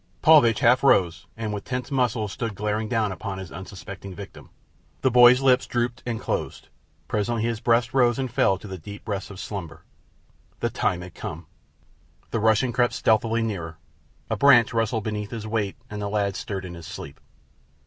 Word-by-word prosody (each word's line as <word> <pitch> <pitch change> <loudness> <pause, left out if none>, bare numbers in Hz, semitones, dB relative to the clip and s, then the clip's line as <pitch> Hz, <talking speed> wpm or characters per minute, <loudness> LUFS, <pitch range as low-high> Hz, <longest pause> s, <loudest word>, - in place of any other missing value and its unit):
Paulvitch 140 -9 +6
half 125 +3 +5
rose, 90 -10 +3
and 110 -2 -3
with 105 - -5
tensed 125 +1 -4
muscles 120 -6 0
stood 115 -3 -4
glaring 105 +2 -2
down 110 -4 +1
upon 95 +1 -5
his 95 -2 -8
unsuspecting 95 0 -9
victim. 100 0 -11 0.5
The 130 - +2
boy's 125 +1 +7
lids 130 -1 +3
drooped 120 0 -2
and 115 -2 -2
closed. - - -4 0.4
Presently 110 +2 -1
his 115 -1 -1
breast 120 +1 +2
rose 120 -3 +3
and 130 -2 -3
fell 95 -2 +2
to 105 - -11
the 95 -2 -7
deep 100 +5 -10
breaths 100 -3 -4
of 95 -2 -10
slumber. 85 -7 -7 0.8
The - - -1
time 90 -1 0
had 90 -1 -10
come! - - -7 0.9
The 115 - 0
Russian 110 +3 +2
crept 120 -1 +2
stealthily 115 -1 +2
nearer. 85 -7 -4 0.5
A - - -1
branch 130 -6 +5
rustled 115 -1 0
beneath 105 -1 -3
his 115 -3 -6
weight 105 -3 -2
and 105 0 -6
the 100 - -2
lad 100 -2 0
stirred 95 -2 -5
in 90 - -7
his 85 -2 -10
sleep. - - -9
110 Hz, 180 wpm, -24 LUFS, 100-120 Hz, 0.9 s, boy's